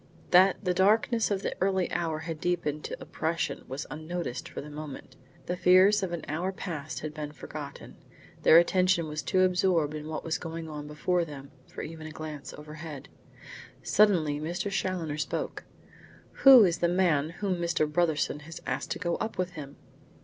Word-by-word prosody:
That 185 +1 +6
the 180 - +2
darkness 220 +5 +3
of 200 -1 -2 0.2
early 190 -1 +2
evening 165 -3 -1
had 160 -1 -6
deepened 165 -4 -1
to - - -5
oppression, 165 +1 -3
was 135 +3 -5
unnoticed 155 -4 -5
for - - -7
the 150 - -8
moment. 150 -1 -8 0.3
The 180 - -2
fears 185 +3 +5
of 190 -2 -2
an 170 - -4
hour 170 +5 -2
past 160 -6 -5
had 155 0 -5
been 150 -1 -5
forgotten. - - -9 0.4
Their 160 - +7
attention 180 -1 +3
was 155 0 -3
too 185 - +1
absorbed 180 -4 +2
in 155 0 -6
what 155 -1 -4
was 160 -1 -2
going 165 0 -6
on 150 -1 -7
before 170 +4 0
them, 140 -3 -9 0.2
for - - -7
even 160 0 -7
a - - -8
glance 155 -2 -7
overhead. 150 -1 -9 0.7
Suddenly 170 -9 +3
Mr. 175 +6 -3
Challoner 175 -6 -2
spoke. 145 - -3 0.8
"Who 265 -4 +11
is 175 -2 0
the 170 - +3
man 170 -5 +2
whom 185 +2 -2
Mr. 170 -2 +1
Brotherson 150 -2 0
has 160 +2 -9
asked - - -3
to - - -7
go 170 -1 -1
up 220 -1 -4
with 185 -1 -1
him?" 145 -5 -9
165 Hz, 175 wpm, -28 LUFS, 150-185 Hz, 0.8 s, Who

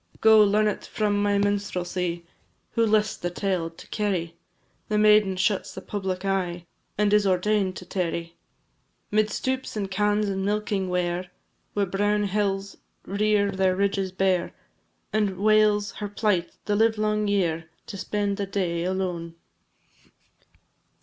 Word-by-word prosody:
Go, 220 -1 +7
learn 210 +1 +3
it 210 - -2
from 205 -1 0
my 205 0 +2
minstrelsy, 180 -4 -1 0.5
Who 230 -1 +2
list 215 0 +1
the 175 - -1
tale 180 -2 -1
to 165 - -15
carry, 185 -6 -2 0.5
The 210 - +1
maiden 210 -2 +5
shuns 190 +2 0
the - - -6
public 190 -2 -4
eye, 180 -3 -1 0.3
And 210 0 +2
is 210 -1 +4
ordain'd 190 +1 +1
to 180 - -8
tarry 170 -2 -3 0.8
'Mid 215 0 +2
stoups 260 +1 -3
and 195 -2 -3
cans, 210 +2 +1
and 195 -1 -2
milking 205 -2 -1
ware, 180 0 -1 0.4
Where 205 -1 +1
brown 205 +2 +1
hills 200 -1 -1 0.3
rear 205 0 +1
their 190 -1 +1
ridges 195 -1 0
bare, 185 -1 0 0.6
And 205 -3 +1
wails 210 0 +3
her 205 -1 -6
plight 205 -4 0
the 210 - +1
livelong 215 -1 +2
year, 165 -5 0 0.2
To - - -8
spend 200 +1 -2
the 200 - -2
day 175 -4 -1
alone. 180 -3 -3
200 Hz, 140 wpm, -25 LUFS, 185-210 Hz, 0.8 s, Go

